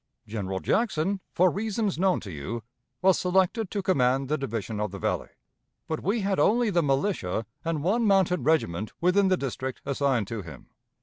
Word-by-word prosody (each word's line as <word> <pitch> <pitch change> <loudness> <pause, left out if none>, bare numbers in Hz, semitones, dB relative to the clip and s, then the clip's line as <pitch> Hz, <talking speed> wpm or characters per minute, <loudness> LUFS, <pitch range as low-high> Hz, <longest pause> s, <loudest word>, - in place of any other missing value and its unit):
General 100 -3 -3
Jackson, 195 - 0
for 180 0 +4
reasons 210 -2 -1
known 190 -1 +3
to 100 - -8
you, 100 +10 -5 0.4
was 190 -1 +5
selected 190 +3 +1
to 200 -2 -3
command 135 -6 +2
the 155 - +1
division 115 -4 -3
of 105 0 -1
the 100 - -7
Valley, - - -2 0.6
but 160 - -3
we 210 +4 0
had 195 -1 0
only 235 0 +3
the 175 -2 +3
militia 135 - 0 0.2
and 165 -3 -2
one 220 +7 +2
mounted 190 - +3
regiment 110 - +1
within 185 +3 +3
the 185 -1 +3
district 130 -2 -4
assigned 135 -5 +1
to 115 -3 -4
him. 85 -4 -11
160 Hz, 175 wpm, -27 LUFS, 115-195 Hz, 0.6 s, was